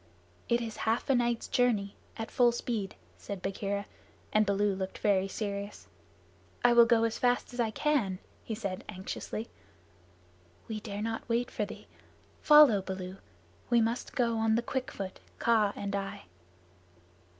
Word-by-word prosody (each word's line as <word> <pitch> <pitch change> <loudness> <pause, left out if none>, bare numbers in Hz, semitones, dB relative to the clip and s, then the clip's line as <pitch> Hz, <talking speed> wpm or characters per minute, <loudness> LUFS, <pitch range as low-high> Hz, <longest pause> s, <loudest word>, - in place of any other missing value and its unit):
"It 235 0 +3
is 225 -2 -5
half 230 +4 +1
a - - +5
night's 240 -2 +1
journey 215 -5 +1 0.2
at 225 -1 -5
full 245 -1 +5
speed," 230 -4 -3 0.2
said 200 -2 -6
Bagheera, 200 +2 -3 0.5
and 215 -1 +4
Baloo 200 0 +2
looked 190 0 -4
very 195 -2 +2
serious. 200 0 -5 0.8
"I 240 - +7
will 235 -1 +7
go 230 -1 +4
as 230 -1 0
fast 245 0 +1
as 245 - -8
I 230 -2 +2
can," 220 -6 0 0.3
he 220 - -4
said 200 -4 -4
anxiously. 210 +3 -5 1.2
"We 220 -1 -4
dare 205 -1 -5
not 225 +1 -4
wait 235 +1 0
for - - -1
thee. - - -10 0.6
Follow, 295 -9 +7
Baloo. 185 0 -6 0.5
We 240 -1 +5
must 230 +2 -1
go 235 -3 +1
on 220 0 +3
the 235 - +1
quick 260 +2 -3
foot 195 -6 -6 0.2
Kaa 220 -3 +3
and 200 0 -3
I." 195 0 -4
220 Hz, 155 wpm, -30 LUFS, 200-235 Hz, 1.2 s, I